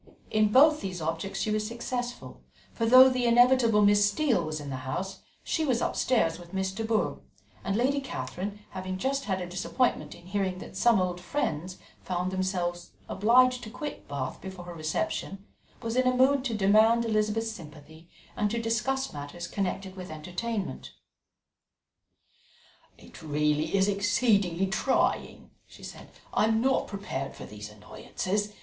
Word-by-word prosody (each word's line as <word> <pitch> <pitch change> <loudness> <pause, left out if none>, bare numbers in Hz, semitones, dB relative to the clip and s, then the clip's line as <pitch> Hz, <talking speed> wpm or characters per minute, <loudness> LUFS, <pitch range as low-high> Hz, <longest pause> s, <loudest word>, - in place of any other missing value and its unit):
In 215 -1 +3
both 300 +5 +6
these 185 -2 -4
objects 165 +5 -3
she 215 - -1
was 215 0 0
successful; 245 +1 -5 0.3
for 230 - -1
though 255 +2 +9
the 255 -2 +1
inevitable 235 -2 +5
Miss 205 0 +5
Steele 235 - +1
was 155 -1 -4
in 145 -1 -7
the 130 - -3
house, 175 +9 -5 0.2
she 320 - -1
was 255 -6 +1
upstairs 180 -13 +1
with 175 +2 -11
Miss 190 0 -1
de 225 +4 -4
Bourgh, 220 -1 0 0.4
and 195 - -1
Lady 265 +5 +2
Catherine 195 - -5
having 185 0 -4
just 275 +7 -1
had 190 -2 -1
a 180 - -4
disappointment 190 +8 -1
in 175 - -16
hearing 190 -1 -1
that 185 - -10
some 230 +1 +4
old 180 -1 -1
friends 180 - -3 0.3
found 180 0 -2
themselves 180 -2 -2
obliged 250 +4 +4
to 215 - -7
quit 295 +5 -7
Bath 135 -2 -4
before 190 -2 -8
her 175 - -8
reception, 170 +4 -3 0.4
was 230 0 -2
in 255 0 +3
a 255 0 +2
mood 265 +1 +4
to 235 -4 -1
demand 215 +3 +4
Elizabeth's 220 0 0
sympathy 160 -2 -13 0.3
and 210 - 0
to 235 +2 -2
discuss 230 +4 -1
matters 145 +4 -7
connected 190 -1 -3
with 185 -1 -8
entertainment. 180 - -5 2.0
"It - - -14
really 150 +2 0
is 190 0 +3
exceedingly 200 -3 +2
trying," 215 +7 0 0.2
she - - -16
said. - - -10 0.2
"I - - +3
am 220 0 +2
not 265 +3 +1
prepared 165 -9 -5
for - - -9
these 105 0 -9
annoyances. 185 - -4
200 Hz, 160 wpm, -28 LUFS, 175-235 Hz, 2.0 s, though